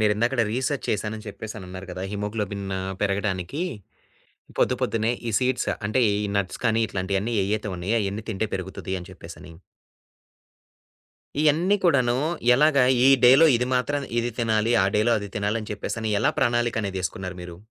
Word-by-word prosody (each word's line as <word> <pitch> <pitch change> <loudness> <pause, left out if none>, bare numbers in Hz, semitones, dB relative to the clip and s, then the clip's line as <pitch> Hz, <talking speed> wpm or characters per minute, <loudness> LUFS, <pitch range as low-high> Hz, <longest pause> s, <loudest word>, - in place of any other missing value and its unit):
మీరిందాకడ 115 +4 +2
research 130 +3 -1
చేశాను 105 +1 -1
అని 110 - -11
చెప్పేసి 110 +1 -7
అన్నారు 95 0 -9
గదా! 90 +1 -6
హిమోగ్లోబిన్ను 100 -2 -3 0.2
పెరగడానికి, 100 - -1 1.0
పొద్దు - - +3
పొద్దున్నే 115 +1 +1 0.2
ఈ - - 0
సీడ్స్ 130 0 0 0.2
అంటే 110 +5 +1
ఈ 105 +1 -1
నట్స్ 95 -2 -3
కానీ 115 -1 +2
ఇట్లాంటియన్ని 100 +4 -2
ఎయ్యయితే 105 0 -2
ఉన్నాయో 95 +7 -1
అయన్నీ 105 +2 -3
తింటే 110 +1 -2
పెరుగుతది 95 0 -5
అని 90 - -11
చెప్పేసని. 85 -2 -11 1.9
ఇయన్ని 160 +7 +3
కూడాను 125 -7 +3 0.4
ఎలాగా 140 -1 +4 0.2
ఈ - - +7 0.2
డేలో 135 +6 +8
ఇది 125 - -1
మాత్ర 140 +3 0 0.2
ఇది 120 - -2
తినాలి 115 0 +1
ఆ - - +2
డేలో 115 +3 +3
అది 100 - -6
తినాలి 105 +2 0
అని 105 - -9
చెప్పేసని 110 +2 -3
ఎలా - - +2
ప్రణాళికనేది 120 -6 0
ఏసుకున్నారు 90 -1 -4
మీరు? 90 -1 -9
110 Hz, 150 wpm, -24 LUFS, 100-120 Hz, 1.9 s, డేలో